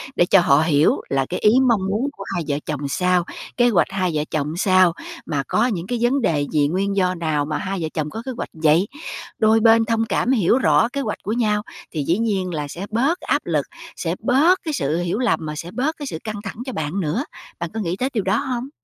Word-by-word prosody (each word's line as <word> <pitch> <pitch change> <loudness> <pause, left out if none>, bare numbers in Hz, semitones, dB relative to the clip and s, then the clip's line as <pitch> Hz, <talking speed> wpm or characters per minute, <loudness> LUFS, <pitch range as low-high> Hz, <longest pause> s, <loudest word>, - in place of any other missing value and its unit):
để 175 - +4
cho 195 +2 +5
họ 150 -3 +4
hiểu 155 -2 +3
là 135 -1 +1
cái 180 - -2
ý 210 - +5 0.2
mong 225 -5 +3
muốn 225 +8 0
của 195 - -6
hai 170 - -1
vợ 145 - 0
chồng 145 -2 -3
sao, 180 +3 +1 0.3
kế 245 -1 +5
hoạch 195 -7 +3
hai 185 -3 0
vợ 150 -1 0
chồng 155 +2 -2
sao, 185 -2 +4 0.3
mà 140 -2 -1
có 220 - +2
những 185 -6 -3
cái 245 - -1
vấn 250 +3 +2
đề 145 -8 +1
gì, 150 -2 +3
nguyên 195 +5 -1
do 185 -1 +1
nào 155 -4 -1
mà 150 0 -2
hai 195 0 -3
vợ 160 - -1
chồng 155 -1 -2
có 225 - -6
kế 265 - -3
hoạch - - -4
vậy. 160 +4 +3 0.5
Đôi 220 +1 +4
bên 225 0 +5
thông 225 0 +1
cảm 235 - 0
hiểu 230 -1 +3
rõ 235 - +3
kế 280 - -1
hoạch 215 -6 -3
của 215 - -2
nhau, 210 -3 +1 0.3
thì 155 -3 -2
dĩ 170 +6 +1
nhiên 195 -5 -1
là 150 -2 -3
sẽ 175 +7 -6
bớt 275 +11 +1
áp - - 0
lực, - - 0 0.3
sẽ - - -2
bớt 330 +8 +3
cái 310 -3 -3
sự 150 - 0
hiểu 175 +4 -1
lầm 245 -3 +2
mà 150 - -4
sẽ 170 +3 -6
bớt 285 +8 -1
cái 290 - -6
sự 160 - -4
căng 215 -2 -5
thẳng 195 - -6
cho 260 - -5
bạn 160 +5 -3
nữa. 180 - -1 0.4
Bạn 170 - -3
có 225 - -3
nghĩ 180 -3 -2
tới 260 +2 0
điều 215 -5 0
đó 195 +3 +1
hông? 260 -2 -3
190 Hz, 250 wpm, -21 LUFS, 160-230 Hz, 0.5 s, cho